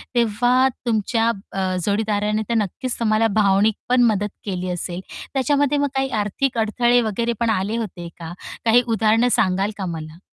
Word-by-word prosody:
तेव्हा 245 +3 +3 0.2
तुमच्या 225 0 +1 0.2
अ, 190 -1 -1
जोडीदाराने 210 0 0
तर - - +1
नक्कीच 230 +5 -3
तुम्हाला 225 -1 +2
भावनिक 205 0 +3
पण 250 0 +4
मदत 205 0 -1 0.2
केली 185 -2 -3
असेल. 175 0 -4 0.3
त्याच्यामध्ये 285 +1 +2
मग 285 0 +2
काही 270 0 0
आर्थिक 240 +5 -2
अडथळे 240 +2 +3
वगैरे 230 +2 -1
पण 235 - +1
आले 210 +1 0
होते 185 -6 -5
का? 165 0 -7 0.3
काही 230 +2 +6
उदाहरणं 225 +1 +3
सांगाल 190 +3 +1
का 195 - -3
मला? 160 -1 -6
220 Hz, 155 wpm, -21 LUFS, 195-240 Hz, 0.3 s, काही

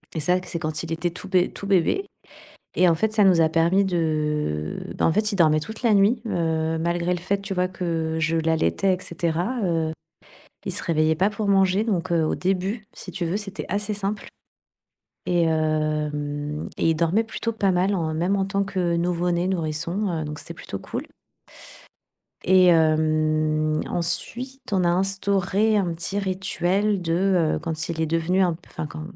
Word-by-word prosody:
et 160 - -1
ça, 180 +4 +2
que 180 - -10
c'est 170 - -4
quand 155 0 -3
il 165 -1 -5
était 165 +2 -1
tout 185 +3 -9
bé 185 -2 +2
tout 200 - -8
bébé 200 - +2 0.7
et 180 - +4
en 170 - +5
fait 215 +7 0
ça 215 -2 +4
nous 180 -4 +5
a 160 - +4
permis 170 +4 +3
de 150 - -1 0.2
bah, - - +1
en - - +3
fait 215 +5 +1
il - - -2
dormait 155 -4 +4
toute 220 +9 -8
la 230 -3 +3
nuit 210 +4 +3
heu, 160 -4 0
malgré 170 +2 0
le - - -6
fait 195 +3 -1
tu 195 0 -4
vois 180 0 +1
que 165 -3 -2
je 160 +1 +1
l'allaitais, 160 - +1
et - - -11
cetera, 170 +8 -2
heu, 165 -3 0 0.7
il - - -2
se - - -3
réveillait 160 -1 +2
pas 190 +5 +2
pour 215 -1 -3
manger. 195 0 +3
Donc 185 -5 -1
heu, 165 -2 +3
au - - 0
début, 195 +4 -2
si 185 - -9
tu 175 0 -3
veux, 175 +5 -1
c'était 205 -1 -6
assez 205 +2 -1
simple, 205 +1 -3 1.0
et 175 -1 +2
hem 150 -2 -1
et - - +2
il 160 - 0
dormait 170 +7 +2
plutôt 230 +1 -3
pas 200 -3 +1
mal, 185 +3 +1
en 160 -3 -1
même 175 +5 +1
en 195 -1 0
tant 195 0 0
que 180 -3 -1
nouveau-né, 175 +1 0
nourrisson, 170 +3 -2
heu, - - -2
donc 150 0 -6
c'était - - -9
plutôt - - -7
cool - - -6 1.4
et 185 0 +6
hem, 155 -1 +2
ensuite, 250 +10 -1
on 185 -2 +2
a - - +3
instauré 195 +3 +1
un 195 - +1
petit 170 +5 -3
rituel 195 +1 0
de, 175 -1 +1
heu, - - -1
quand 160 -1 -4
il 165 -1 -2
est - - +1
devenu 165 +4 +1
un 180 -2 +2
p 160 - -12
f - - -20
enfin, 155 - -4
quand, 155 +1 -8
175 Hz, 195 wpm, -24 LUFS, 160-195 Hz, 1.4 s, et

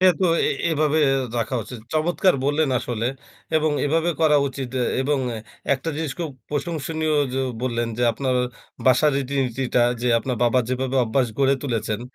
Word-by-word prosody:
এ 185 - +5
তো 185 - +4 0.2
এ - - +2 0.2
এভাবে 155 -1 +2 0.4
রাখা 115 +3 -2
উচিত। 115 +4 -9
চমৎকার 175 +4 +2
বললেন, 145 +2 +2
আসলে 115 -1 -3 0.5
এবং 155 0 +2 0.2
এভাবে 165 +3 +1
করা 155 -2 +5
উচিত 130 -1 -6
এ - - +2 0.2
এবং 145 +1 +1 0.6
একটা 135 +4 -5
জিনিস 155 -3 -2
খুব 165 -3 -3 0.2
প্রশংসনীয় 155 +1 -2 0.2
য - - -4 0.3
বললেন, 120 -2 -1
যে - - +1
আপনার 130 +2 -1 0.5
বাসার 130 +4 +5
রীতিনীতিটা 130 -2 0 0.2
যে 125 - +1
আপনার 125 +2 -3
বাবা 120 +2 +3
যেভাবে 130 +1 -1
অভ্যাস 125 +3 +1
গড়ে 135 0 +4
তুলেছেন, 115 -5 -2
135 Hz, 160 wpm, -23 LUFS, 125-155 Hz, 0.6 s, এ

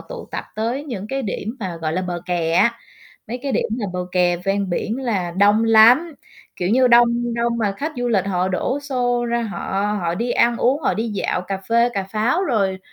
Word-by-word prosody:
tụ - - -9
tập - - -4
tới 235 +6 -2
những 215 -8 -6
cái 270 +2 -2
điểm 220 +2 -4
mà, 185 -4 -4
gọi 155 0 -1
là, 185 - -1
bờ 175 -1 -4
kè 170 -2 -1
á, 210 +7 +3 0.5
mấy 245 - -4
cái 275 - -2
điểm - - +1
là 210 - -2
bờ 180 - -3
kè 180 -1 +2
ven 195 +2 -2
biển 215 +6 -2
là 205 -9 -1
đông 205 +5 +3
lắm. 235 +9 +6 0.4
Kiểu 180 - -2
như, 255 +2 +4
đông 240 0 +4
đông 235 0 0
mà 210 -3 0
khách 310 +6 -3
du 245 0 -1
lịch 200 -5 +1
họ 185 -1 0
đổ 190 +9 -1
xô 245 -4 -1
ra 235 0 0
họ 205 0 -2
họ 170 -1 -1
đi 235 +6 -2
ăn 235 -1 +3
uống, 270 +5 +1
họ - - +1
đi 225 +2 -2
dạo, 205 -3 -1
cà 195 +1 -4
phê 235 +1 +4
cà 195 - 0
pháo. 225 - 0
Rồi 200 - 0
220 Hz, 225 wpm, -21 LUFS, 190-240 Hz, 0.5 s, lắm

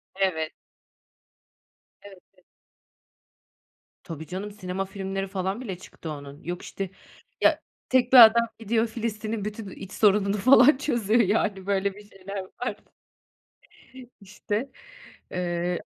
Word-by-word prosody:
Evet. 175 -5 0 1.5
Evet, 200 -1 -13 0.2
evet. - - -28 1.6
Tabii 160 -2 -7
canım, 195 +3 -5
sinema 195 -2 -4
filmleri 195 0 -4
falan 190 +3 -3
bile 195 -8 -5
çıktı 170 -2 -10
onun. 145 -1 -9
Yok 175 +1 -5
işte, 195 -1 -5 0.5
ya - - +4 0.3
tek 255 -1 +2
bir - - +10
adam 230 +1 +3
gidiyor 225 +1 +1
Filistin'in 220 -2 -4
bütün, 210 0 -6
iii, - - -10
iç 195 -1 -10
sorununu 205 -1 +3
falan 255 +6 +6
çözüyor. 235 -5 +1
Yani 200 -2 0
böyle 200 0 0
bir 205 +1 -15
şeyler 195 +1 -7 0.2
var. 245 -4 -2 1.5
İşte, 210 +5 -4 0.6
eee 175 -1 -1
200 Hz, 120 wpm, -26 LUFS, 190-220 Hz, 1.6 s, bir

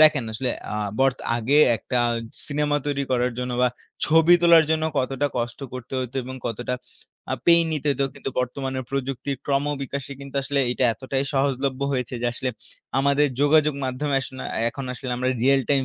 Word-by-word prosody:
দেখেন 150 -5 +6
আসলে 125 +4 -2 0.2
আ - - -4 0.3
বরতো 135 -1 +2
আগে 125 +5 +2 0.2
একটা 125 +3 -4 0.5
সিনেমা 145 0 +1
তৈরি 140 -1 0
করার 125 0 +1
জন্য 125 0 -2
বা, 125 - +5 0.4
ছবি 165 +3 +6
তোলার 170 -2 +7
জন্য 160 0 +2
কতটা 135 +2 0
কষ্ট 120 0 -2
করতে 130 0 -8
হইতো 130 +1 -4
এবং 130 +1 -6
কতটা 120 +2 -2 0.6
আ - - +2
পেইন 170 -1 +6
নিতে 150 -1 -3
হইতো। 140 0 +1
কিন্তু 135 - -5
বর্তমানের 130 +1 -2
প্রযুক্তির 135 0 -2
ক্রমবিকাশে 140 -1 -1
কিন্তু 140 0 -10
আসলে 140 +1 0
এটা 125 - 0
এতটাই 135 +2 -2
সহজলভ্য 135 -1 0
হয়েছে। 125 -1 -2
যে - - +2
আসলে 130 +2 -3 0.5
আমাদের 140 +1 +3
যোগাযোগ 150 0 +4
মাধ্যমে 135 +3 -1
য়াস্না 130 0 -4 0.2
এখন 135 +2 -6
আসলে 125 0 -6
আমরা 125 +1 0
real 135 +1 +5
time 135 -2 +3
135 Hz, 170 wpm, -24 LUFS, 130-145 Hz, 0.6 s, তোলার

